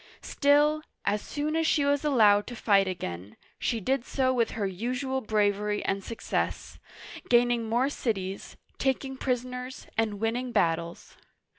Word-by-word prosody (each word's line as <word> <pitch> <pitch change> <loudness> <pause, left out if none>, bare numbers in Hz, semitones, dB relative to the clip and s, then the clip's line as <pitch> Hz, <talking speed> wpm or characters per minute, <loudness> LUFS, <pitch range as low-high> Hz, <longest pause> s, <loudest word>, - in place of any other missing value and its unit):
Still, 295 +2 +3 0.2
as 205 +1 +1
soon 300 +1 -3
as 325 -1 +1
she 290 -3 +2
was 285 0 +1
allowed 215 -8 +4
to 245 - -6
fight 200 -4 +3
again, 95 - -5 0.2
she 230 - 0
did 260 +4 0
so 260 0 0
with 235 -3 +1
her 205 - 0
usual 250 +7 -2
bravery 210 -1 0
and 195 0 -1
suc 230 - -8
cess, - - -2 0.5
gaining 240 -1 +3
more 240 +4 +2
cities, 195 -8 -3 0.2
taking 265 0 -1
prisoners, 250 0 -3
and 215 -3 0
winning 240 +3 -1
battles. 170 -5 -1
235 Hz, 145 wpm, -28 LUFS, 205-265 Hz, 0.5 s, allowed